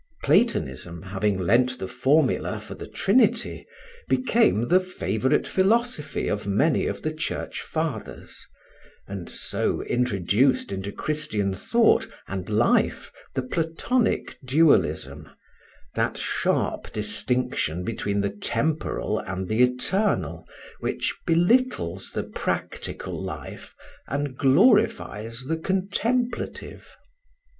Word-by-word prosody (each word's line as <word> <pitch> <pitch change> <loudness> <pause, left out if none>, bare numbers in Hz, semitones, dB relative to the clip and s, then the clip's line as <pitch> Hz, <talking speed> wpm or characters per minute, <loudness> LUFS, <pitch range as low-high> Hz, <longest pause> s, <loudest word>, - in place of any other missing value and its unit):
Platonism, 85 +7 +1
having 95 +1 -1
lent 120 +8 +2
the 95 - -5
formula 140 +4 +1
for - - -9
the - - -8
Trinity, - - +1 0.4
became 130 - +2
the 180 +2 +6
favorite 150 - 0
philosophy 215 -3 +1
of 105 -1 -2
many 140 +11 +2
of - - -4
the 155 - 0
Church 155 - -4
fathers, 155 -9 -5 0.6
and 95 -3 -6
so - - 0
introduced 120 +1 +1
into 95 +1 -4
Christian 105 -9 -1
thought 230 - +3 0.2
and 95 0 -5
life 110 +3 +2 0.2
the 130 - 0
Platonic 165 - -1
dualism, 130 - +2 0.6
that - - 0
sharp - - -1
distinction 125 -9 -1
between 100 -1 -1
the 100 0 -1
temporal 150 +9 -1
and 95 0 -4
the 110 +4 +1
eternal 125 +12 +1 0.3
which - - -2
belittles 170 - +2
the - - -2
practical - - -4
life - - -7 0.3
and 140 0 -2
glorifies 130 - +3
the 160 +4 -1
contemplative. 220 +8 -2
130 Hz, 100 wpm, -25 LUFS, 100-165 Hz, 0.6 s, the